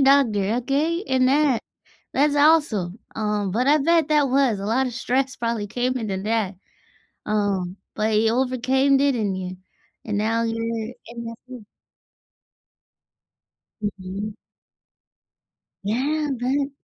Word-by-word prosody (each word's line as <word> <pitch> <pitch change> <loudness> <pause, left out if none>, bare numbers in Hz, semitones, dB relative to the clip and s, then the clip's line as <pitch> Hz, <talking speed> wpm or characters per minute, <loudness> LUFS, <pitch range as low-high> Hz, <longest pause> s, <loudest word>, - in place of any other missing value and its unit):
doctor, 235 -6 +4
okay, 310 +7 0
and 255 -1 +3
that 280 -4 +3 0.5
that's 290 +1 +3
awesome, 285 - +3 0.2
um, 210 -2 -1
but 245 +5 +1
I 300 +1 +6
bet 330 +1 +3
that 295 -3 +3
was 260 -5 +2
a 195 - -5
lot 255 +5 +2
of - - -7
stress 260 +2 -1
probably 230 -4 -2
came 250 +4 -1
into 215 -5 -2
that, 210 -3 -1 0.7
um, 200 -3 -1 0.2
but 215 0 +1
you 220 +1 +3
overcame, 260 +2 +2
didn't 240 -8 +1
you? 185 0 -5 0.5
And 210 -2 -2
now 225 +2 +1
you're 230 0 -2
in 235 0 -8
the 230 0 -6
field. 250 -4 -10 2.2
Mhm. 200 0 -4 1.5
Yeah. 285 +9 0
But 275 +3 0
235 Hz, 125 wpm, -23 LUFS, 210-275 Hz, 2.2 s, I